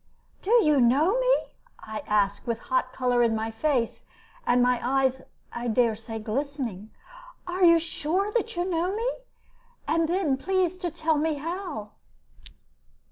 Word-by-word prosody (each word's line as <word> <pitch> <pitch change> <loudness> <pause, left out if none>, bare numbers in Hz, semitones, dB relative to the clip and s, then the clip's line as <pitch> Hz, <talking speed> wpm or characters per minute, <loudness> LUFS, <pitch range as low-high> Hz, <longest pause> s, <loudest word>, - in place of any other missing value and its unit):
"Do 385 - -6
you 300 -4 +4
know 300 - +3
me?" - - +4 0.4
I 215 0 -6
asked, 205 0 +1
with 230 -1 0
hot 255 +2 -1
color 250 -1 +1
in 230 -2 +3
my 220 +1 -2
face, 240 0 -1 0.4
and 245 - +4
my 245 0 +3
eyes, 265 0 +1 0.3
I 240 0 -4
dare 230 -1 +2
say, 225 +1 -7
glistening. 230 -2 -4 0.6
"Are 365 +1 -2
you 335 -1 +8
sure 335 +4 -1
that 460 -1 -1
you 350 0 -1
know 360 +1 -1
me? 460 +3 -1 0.8
And 325 0 +1
then 340 -7 +1
please 370 +3 0
to 360 -1 -3
tell 315 0 0
me 315 0 0
how." 315 - -5
280 Hz, 150 wpm, -26 LUFS, 235-350 Hz, 0.8 s, you